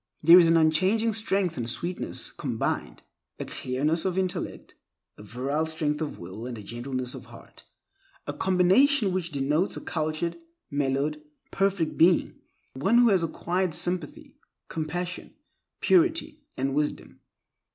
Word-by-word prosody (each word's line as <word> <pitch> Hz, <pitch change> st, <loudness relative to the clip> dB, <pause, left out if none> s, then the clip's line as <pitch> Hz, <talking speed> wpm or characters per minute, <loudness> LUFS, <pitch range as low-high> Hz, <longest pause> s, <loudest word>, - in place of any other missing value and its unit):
There 170 Hz, +3 st, +9 dB
is 170 Hz, -, +6 dB
an 165 Hz, 0 st, +5 dB
unchanging 185 Hz, +8 st, +3 dB
strength 195 Hz, -5 st, 0 dB
and 120 Hz, -1 st, -2 dB
sweetness 175 Hz, +9 st, -4 dB
combined; -, -, -3 dB, 0.3 s
a -, -, -5 dB
clearness 150 Hz, +6 st, -1 dB
of 185 Hz, -1 st, -1 dB
intellect, 185 Hz, -1 st, -3 dB, 0.4 s
a -, -, -14 dB
virile 135 Hz, +9 st, -2 dB
strength 155 Hz, -1 st, -1 dB
of 155 Hz, -, -4 dB
will 95 Hz, +7 st, -8 dB
and 120 Hz, -2 st, -6 dB
a 105 Hz, -, -9 dB
gentleness 125 Hz, +3 st, -4 dB
of -, -, -8 dB
heart—a 390 Hz, 0 st, -14 dB
combination 190 Hz, +6 st, +3 dB
which 175 Hz, -2 st, -2 dB
denotes 150 Hz, +6 st, 0 dB
a -, -, -6 dB
cultured, 155 Hz, -, -3 dB, 0.3 s
mellowed, 145 Hz, +2 st, -1 dB, 0.3 s
perfected 195 Hz, -5 st, 0 dB
being; 170 Hz, +1 st, +3 dB, 0.3 s
one 195 Hz, -, +2 dB
who 240 Hz, -1 st, +6 dB
has 190 Hz, -4 st, +3 dB
acquired 175 Hz, +1 st, -1 dB
sympathy, 175 Hz, -2 st, -3 dB, 0.3 s
compassion, 175 Hz, +3 st, -4 dB, 0.5 s
purity, 325 Hz, -4 st, +2 dB, 0.2 s
and 135 Hz, +1 st, -1 dB
wisdom. 150 Hz, +1 st, -3 dB
165 Hz, 130 wpm, -26 LUFS, 145-190 Hz, 0.5 s, There